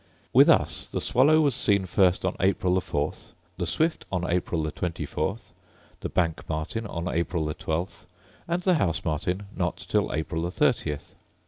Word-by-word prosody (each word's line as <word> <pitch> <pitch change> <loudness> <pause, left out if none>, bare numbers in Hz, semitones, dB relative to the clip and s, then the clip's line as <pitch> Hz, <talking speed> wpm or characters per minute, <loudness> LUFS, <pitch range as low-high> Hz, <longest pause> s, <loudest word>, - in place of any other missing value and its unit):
With - - +7
us - - +3
the - - -3
swallow 150 +5 +4
was 145 -3 +3
seen 100 -5 +1
first 90 0 +2
on 95 - 0
April 95 -1 +2
the 95 - +2
4th, 75 -3 -3 0.2
the 90 - -2
swift 160 - 0
on 90 -2 -1
April 85 -2 0
the 80 - -2
24th, 90 +4 -3 0.5
the - - -4
bank 85 -3 0
martin 80 +9 -3
on 85 -2 -4
April 85 -1 -1
the 75 - -2
12th, 85 +5 -4 0.4
and 170 +2 -1
the 185 - +4
house 85 -8 0
martin 90 +5 -1
not 90 -2 -1
till - - 0
April 80 +1 -2
the 85 - -1
30th. 75 -4 0
90 Hz, 175 wpm, -26 LUFS, 80-100 Hz, 0.5 s, With